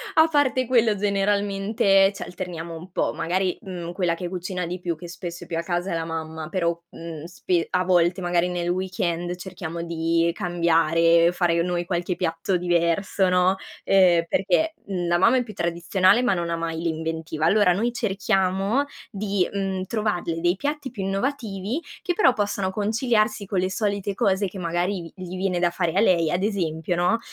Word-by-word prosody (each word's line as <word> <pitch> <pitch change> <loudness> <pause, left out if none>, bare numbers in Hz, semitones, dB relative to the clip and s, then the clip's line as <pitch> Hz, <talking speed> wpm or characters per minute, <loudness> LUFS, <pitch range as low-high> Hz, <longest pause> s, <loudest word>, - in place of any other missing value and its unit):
a 315 +1 +6
parte 275 -4 +2
quello 230 -4 +3
generalmente 200 0 +2
ci - - -6
alterniamo 170 -2 -6
un 175 +3 -10
po', - - 0
magari, 185 +2 -1
mhmm, 175 -4 -6
quella 175 -3 0
che 175 +1 -5
cucina 180 0 -4
di 180 +2 -5
più, 175 -2 -2
che 175 +2 -10
spesso 175 0 -7
è - - -19
più 165 - -3
a - - 0
casa, 175 +2 -2
è - - -1
la 165 - -1
mamma 160 -1 -5
però, 170 -2 0
mhmm, 165 -2 -8
spe 175 0 -1
a 180 0 +2
volte 180 0 +3
magari 175 0 +1
nel 175 -1 -2
weekend 175 -1 -2
cerchiamo 170 -2 -6
di 165 0 +1
cambiare, 170 -1 +3
fare 170 -2 +2
noi 175 -1 -1
qualche 175 0 -1
piatto 175 +2 -1
diverso, 175 +2 +1
no, 180 +1 +3 0.3
ehm 180 -3 +5
perché, 195 - +1
mhmm, 180 -3 -2
la 175 0 +3
mamma 250 +7 +5
è 250 - +1
più 215 - -10
tradizionale 185 +6 +2
ma 240 - +3
non 170 -1 -2
ha 170 - 0
mai 165 -1 -3
l'inventiva. 160 -1 -2
Allora 200 0 +4
noi 230 +5 0
cerchiamo 195 +3 +1 0.3
di, 200 -3 0
mhmm, 195 -2 -2
trovarle 190 -6 -2
dei 175 +1 +2
piatti 290 0 -3
più 205 -6 -5
innovativi 210 - -2 0.2
che 355 - 0
però 340 - +4
possano 200 -3 -1
conciliarsi 215 0 0
con 190 -1 -1
le 185 +1 0
solite 200 0 -1
cose 200 -3 +1
che, 190 +1 -8
magari, 175 +1 -2
vi 185 - -8
gli 185 +1 -6
viene 185 -2 0
da 175 - +3
fare 170 -2 -1
a 195 - +2
lei, 170 -6 +3
ad 180 +2 0
esempio, 175 -5 -1
no, 180 +6 +2
180 Hz, 185 wpm, -24 LUFS, 170-200 Hz, 0.3 s, a